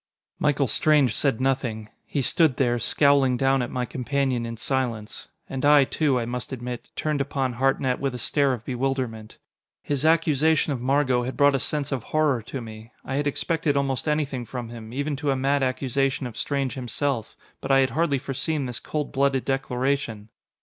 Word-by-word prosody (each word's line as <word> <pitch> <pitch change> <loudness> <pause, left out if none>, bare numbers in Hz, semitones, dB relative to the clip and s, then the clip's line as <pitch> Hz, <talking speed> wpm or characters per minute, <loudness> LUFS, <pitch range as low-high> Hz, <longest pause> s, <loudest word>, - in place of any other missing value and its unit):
Michael 145 -1 +2
Strange 140 0 +3
said 135 -6 +1
nothing. 125 -5 -1 0.2
He 140 - -1
stood 155 -1 +3
there, 120 -3 +2
scowling 140 -1 +3
down 135 +1 +2
at 120 - -2
my 125 -1 -2
companion 130 -2 -1
in 115 0 -6
silence. 120 -4 -3 0.2
And 135 -1 -5
I, 145 -1 +7
too, 140 0 +1
I 115 - -2
must 125 +1 -5
admit, 125 -1 -6
turned 150 -2 -1
upon 135 -2 -1
Hartnett 130 +1 +1
with 135 -2 -2
a - - -3
stare 140 +3 +1
of 115 -3 -6
bewilderment. 125 -4 -3 0.5
His 145 -1 -2
accusation 160 -1 +3
of 125 - -5
Margot 130 -1 +2
had 125 +2 -4
brought 145 0 +5
a 135 - +1
sense 145 +1 -1
of 135 -3 -1
horror 150 -2 +1
to 130 +4 -6
me. 110 0 -10
I 130 - -4
had 145 +2 0
expected 150 0 0
almost 135 +1 -1
anything 150 -4 0
from 120 0 -6
him, 115 -1 -9
even 145 +3 -2
to 145 0 -2
a 135 - +2
mad 135 +2 +1
accusation 135 +1 0
of 120 -3 -7
Strange 135 +1 -1
himself. 125 -1 -2 0.3
But 135 - -5
I 135 0 +5
had 130 - +1
hardly 150 +1 +1
foreseen 140 +3 -2
this 125 -2 -4
cold 150 -2 -3
blooded 135 -1 +1
declaration. 135 -4 -1
135 Hz, 185 wpm, -25 LUFS, 125-140 Hz, 0.5 s, I